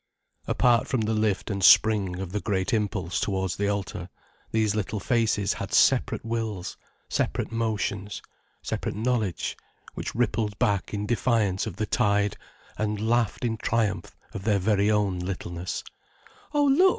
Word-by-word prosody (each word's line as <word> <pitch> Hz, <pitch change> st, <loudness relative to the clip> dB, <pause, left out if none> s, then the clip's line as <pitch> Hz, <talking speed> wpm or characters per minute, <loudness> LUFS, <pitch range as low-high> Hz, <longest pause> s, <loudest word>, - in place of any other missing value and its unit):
Apart 120 Hz, -2 st, +3 dB
from 130 Hz, -4 st, 0 dB
the 110 Hz, +1 st, 0 dB
lift 110 Hz, -1 st, 0 dB
and 100 Hz, -1 st, -2 dB
spring 100 Hz, -4 st, +5 dB
of 95 Hz, -2 st, -5 dB
the 105 Hz, -, -1 dB
great 95 Hz, +1 st, -1 dB
impulse 100 Hz, -5 st, -1 dB
towards 95 Hz, -2 st, -1 dB
the 100 Hz, -, 0 dB
altar, 100 Hz, -3 st, -3 dB, 0.4 s
these 110 Hz, -2 st, +1 dB
little 105 Hz, 0 st, -2 dB
faces 110 Hz, -2 st, +1 dB
had -, -, -6 dB
separate -, -, +3 dB
wills, 110 Hz, -5 st, -3 dB, 0.3 s
separate -, -, -1 dB
motions, 105 Hz, -3 st, -2 dB, 0.4 s
separate -, -, -3 dB
knowledge, 110 Hz, -4 st, -1 dB, 0.4 s
which -, -, -5 dB
rippled 110 Hz, -3 st, 0 dB
back 100 Hz, -2 st, +1 dB
in 105 Hz, 0 st, -2 dB
defiance 110 Hz, -4 st, +1 dB
of 100 Hz, -, -5 dB
the 110 Hz, -, -1 dB
tide, 100 Hz, -2 st, +1 dB, 0.4 s
and 105 Hz, 0 st, -1 dB
laughed 120 Hz, -1 st, +1 dB
in 115 Hz, -1 st, -1 dB
triumph 105 Hz, -6 st, -1 dB, 0.2 s
of 95 Hz, -, -6 dB
their 105 Hz, 0 st, +2 dB
own -, -, +1 dB
very 105 Hz, +1 st, +2 dB
littleness. 90 Hz, -3 st, -2 dB, 0.7 s
"Oh, 295 Hz, -1 st, +2 dB
look!" 295 Hz, +8 st, +6 dB
105 Hz, 150 wpm, -26 LUFS, 100-115 Hz, 0.7 s, look